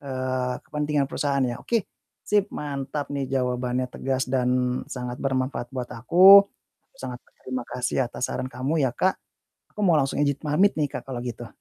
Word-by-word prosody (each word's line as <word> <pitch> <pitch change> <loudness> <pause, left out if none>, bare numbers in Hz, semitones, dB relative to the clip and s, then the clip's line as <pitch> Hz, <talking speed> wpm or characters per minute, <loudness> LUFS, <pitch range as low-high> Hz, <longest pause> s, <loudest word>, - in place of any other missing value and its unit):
eee, 130 -2 -2
kepentingan 150 -1 0
perusahaan 140 -2 0
ya. 120 -1 -2
Oke, 230 -4 0 0.4
sip, 205 -1 +2
mantap 140 0 -4
nih, 140 -1 -2
jawabannya 125 -1 -1
tegas 135 0 -1
dan 125 -1 +1
sangat 125 -1 -5
bermanfaat 130 -2 -1
buat 125 -2 -4
aku, 185 - +8 0.5
sangat - - -6
berterima 480 - -6
kasih 125 0 -1
atas 125 - -4
saran - - -3
kamu 130 +6 -2
ya, 120 - -2
Kak. 190 +1 +1 0.6
Aku - - -8
mau 175 - +5
langsung 135 -2 0
ijin 145 -2 +2
pamit 165 +7 +3
nih, 150 - +1
Kak, 130 - -7
kalau 125 -2 -4
gitu. 120 -1 -6
135 Hz, 165 wpm, -25 LUFS, 125-150 Hz, 0.6 s, aku